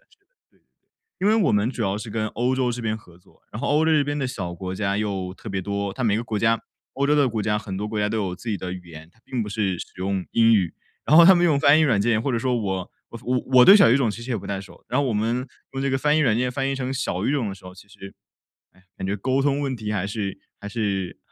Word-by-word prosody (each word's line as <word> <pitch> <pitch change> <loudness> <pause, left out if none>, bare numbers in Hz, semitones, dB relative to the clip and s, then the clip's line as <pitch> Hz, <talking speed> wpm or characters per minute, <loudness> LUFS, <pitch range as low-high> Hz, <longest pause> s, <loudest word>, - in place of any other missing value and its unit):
对， - - -30
对。 400 - -42 0.9
因 195 - +1
为 215 - +4
我 - - +2
们 105 +2 +2
主 125 -3 -4
要 100 -1 0
是 110 - -7
跟 110 0 -2
欧 125 +4 -1
洲 130 -1 0
这 120 +1 -4
边 110 -2 -2
合 90 -5 -17
作， 90 - -26
然 - - -6
后 - - -2
欧 150 +2 +3
洲 160 - +3
这 150 -2 +3
边 145 +1 -2
的 135 - -1
小 95 -9 -5
国 90 +1 -6
家 100 0 -1
又 95 -3 -3
特 110 - -10
别 95 -2 -2
多， 100 +1 -3
它 130 - -3
每 105 -2 +2
个 115 - -2
国 110 -3 -3
家 115 +2 +2 0.3
欧 140 +1 0
洲 150 - +4
的 140 -3 +4
国 110 -2 -2
家， 105 0 0
很 100 -3 -6
多 105 +2 -3
国 110 0 -3
家 105 0 +1
都 110 - -2
有 95 -4 -2
自 120 - -9
己 105 - 0
的 90 0 -5
语 90 -1 -9
言， 80 -1 -11
它 115 - -30
并 125 -3 -3
不 105 - -6
是 100 -3 -1
使 - - -6
用 95 0 -2
英 115 0 +5
语。 95 -6 +1 0.3
然 155 - +4
后 170 - +10
他 190 +3 +8
们 175 0 +3
用 155 -5 +3
翻 145 +1 +6
译 - - +4
软 120 -10 +3
件， 110 +1 +2
或 135 - -1
者 120 - +1
说 125 +2 0
我 95 -5 -3 0.2
我 115 - -8
我 125 0 0 0.2
我 125 - +9
对 195 - +9
小 200 - +6
语 125 - +5
种 135 -4 +1
其 115 +3 -7
实 125 - -7
也 120 - 0
不 100 - -8
太 100 -1 -3
熟， 100 - -15
然 130 - +1
后 - - +1
我 125 - 0
们 115 +4 -1 0.3
用 135 0 -3
这 140 - 0
个 135 - +1
翻 150 +2 +2
译 - - +3
软 115 -7 +3
件 125 +1 0
翻 135 0 -1
译 - - -1
成 130 0 -3
小 135 - -2
语 - - +1
种 135 -7 0
的 95 - -5
时 95 - -18
候， 90 0 -10
其 95 +2 -16
实， 100 -1 -12 0.6
唉， 95 - -25
感 95 - -4
觉 100 - -1
沟 130 +6 0
通 140 0 +1
问 135 -2 -2
题 110 -3 -5
还 95 -2 -1
是 100 -1 -4 0.2
还 100 - -7
是 100 -4 -2
110 Hz, 330 characters per minute, -23 LUFS, 100-130 Hz, 0.9 s, 后